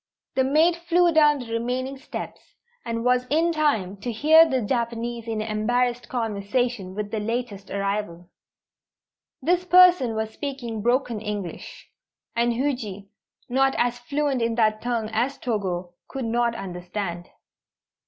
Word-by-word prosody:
The 265 - +2
maid 315 +6 +3
flew 345 0 +2
down 300 -2 +5
the 240 -4 -7
remaining 250 +3 -2
steps, 270 - -8 0.3
and 230 0 -3
was 250 0 +2
in 330 +3 +2
time 250 - 0
to 235 +5 -4
hear 315 +8 +6
the 260 - +1
Japanese 235 0 -2
in 220 -1 -2
embarrassed 240 +3 0
conversation 220 -3 -2
with 205 -1 -4
the 220 - -1
latest 215 -2 -4
arrival. 200 -3 -3 1.2
This 355 +4 +2
person 360 -10 +6
was 220 0 -2
speaking 245 -6 -5
broken 240 -1 +1
English, 205 -5 -6 0.5
and 235 +1 +2
Huji, 230 -7 -3 0.4
not 270 +2 +2
as 245 0 +1
fluent 280 +1 -1
in 230 0 0
that 215 -2 +2
tongue 235 -2 -1
as 250 +5 0
Togo, 185 -6 -3
could 265 -3 -5
not 235 +1 +1
understand. 180 -2 -5
235 Hz, 135 wpm, -24 LUFS, 210-265 Hz, 1.2 s, hear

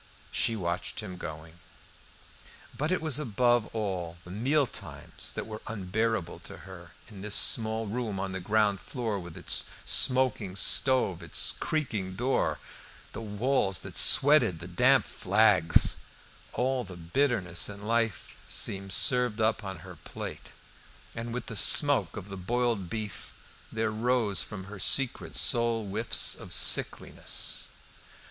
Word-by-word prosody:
She 115 - +1
watched 85 +1 -4
him 95 -4 -8
going. 80 +1 -9 1.2
But 150 +5 -2
it 185 -3 -1
was 155 -3 +2
above 120 -3 +1
all 95 -6 -4
the 90 - -12
meal 135 +9 +1
times - - -7
that - - -5
were 110 -1 -8
unbearable 110 -2 -2
to - - -11
her, 85 -5 -12
in 100 -3 -12
this 105 0 -1
small 110 0 +3
room 110 -2 -4
on 95 0 -3
the 95 - -4
ground 105 +1 +1
floor, 115 -6 -4
with 85 -2 -10
its - - +1 0.2
smoking 125 -7 +1
stove, 100 -3 +2
its 85 -2 +3
creaking 110 -12 -3
door, 125 +6 0 0.6
the - - -6
walls 105 -2 0
that - - -10
sweated, 135 - +5
the 85 +2 -9
damp 90 -1 +3
flags; 100 -4 +3 0.6
all 130 0 -1
the 90 -4 -11
bitterness 90 -2 0
in 100 0 -9
life 115 -3 -2
seemed 95 0 -2
served 125 -4 +3
up 110 0 0
on 95 -4 -7
her 90 -3 -11
plate, 75 - -9 0.6
and 115 +1 -6
with 115 -1 -5
smoke 120 - +5
of 100 -1 -7
the 95 - -7
boiled 115 -1 -1
beef 105 -2 -6 0.4
there 110 -1 -1
rose 110 -4 +1
from 105 -3 -7
her 100 +1 -10
secret 135 +5 +1
soul 115 -2 +3
whiffs 110 +4 +2
of - - -9
sickliness. - - -1
110 Hz, 140 wpm, -28 LUFS, 95-120 Hz, 1.2 s, sweated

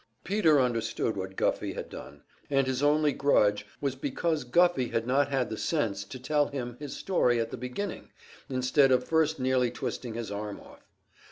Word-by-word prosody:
Peter 170 -7 +3
understood 115 -3 0
what 95 0 -5
Guffey - - 0
had - - -6
done, 70 0 -11 0.3
and 135 -1 +2
his 130 0 -1
only 150 0 +3
grudge 105 -8 +2
was 140 -2 -1
because 150 +3 -1
Guffey 135 0 +3
had 115 -1 -1
not 135 +3 +2
had 130 -4 0
the 110 - -4
sense 110 -11 -1
to 130 - -8
tell 145 +3 +1
him 125 -4 -5
his 145 -2 -6
story 125 -11 +2
at 115 0 -2
the - - -4
beginning, 125 - -5 0.4
instead 130 +1 +3
of 125 0 +2
first 160 -1 +2
nearly 130 -1 +2
twisting 120 -1 -5
his 115 -3 -5
arm 105 0 -5
off. - - -17
130 Hz, 180 wpm, -29 LUFS, 115-145 Hz, 0.4 s, Peter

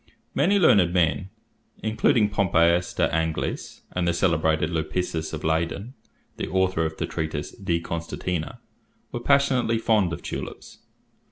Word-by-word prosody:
Many 200 - +3
learned 100 - +5
men, 90 +2 +1 0.5
including 110 0 +3
Pompeius 90 -3 +3
de - - +3
Angelis 80 0 -2
and 90 -1 -1
the 85 - +1
celebrated 80 -3 +1
Lipsius 80 0 -2
of 80 - -6
Leyden, 85 +9 -1 0.4
the - - -3
author 95 -3 +1
of 80 - -9
the - - -1
treatise 75 -2 -4
"De 85 -4 -1
Constantia," 85 0 -4 0.5
were 120 - -3
passionately 130 -3 +2
fond 110 -5 +2
of - - -6
tulips. - - -7
85 Hz, 135 wpm, -25 LUFS, 80-105 Hz, 0.5 s, learned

